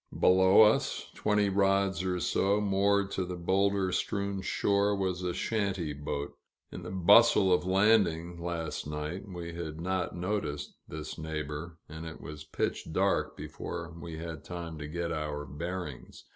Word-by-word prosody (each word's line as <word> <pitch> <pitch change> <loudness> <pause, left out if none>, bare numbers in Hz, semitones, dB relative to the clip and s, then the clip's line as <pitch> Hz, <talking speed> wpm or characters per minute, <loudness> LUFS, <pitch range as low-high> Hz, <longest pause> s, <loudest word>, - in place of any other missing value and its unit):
Below 95 +3 +7
us, 105 0 +2
twenty 105 -1 +2
rods 95 -2 +2
or 90 -1 -1
so, 100 +3 +2
moored 100 0 +2
to 95 - -1
the 90 0 -5
boulder 95 +2 +1
strewn 100 0 -1
shore, 100 +1 +1
was 95 -2 -1
a 90 -1 -1
shanty 95 -6 -1
boat. 70 0 -4 0.4
In - - -7
the - - -7
bustle 95 +1 +6
of 90 0 +1
landing, 95 -4 +3
last 85 -3 -3
night, 75 +6 -4
we 85 -3 -6
had 80 -2 -5
not 90 +1 -2
noticed 90 -4 -3
this 75 0 -7
neighbor, 80 +1 -5
and 80 +1 -7
it 80 - -8
was 75 0 -8
pitch - - -2
dark 95 +4 +1
before 85 -1 -6
we 85 -1 -7
had 80 -2 -6
time 85 -3 -6
to 75 - -5
get 85 +2 -3
our 75 -2 -3
bearings. 75 -2 -6
90 Hz, 155 wpm, -30 LUFS, 80-100 Hz, 0.4 s, Below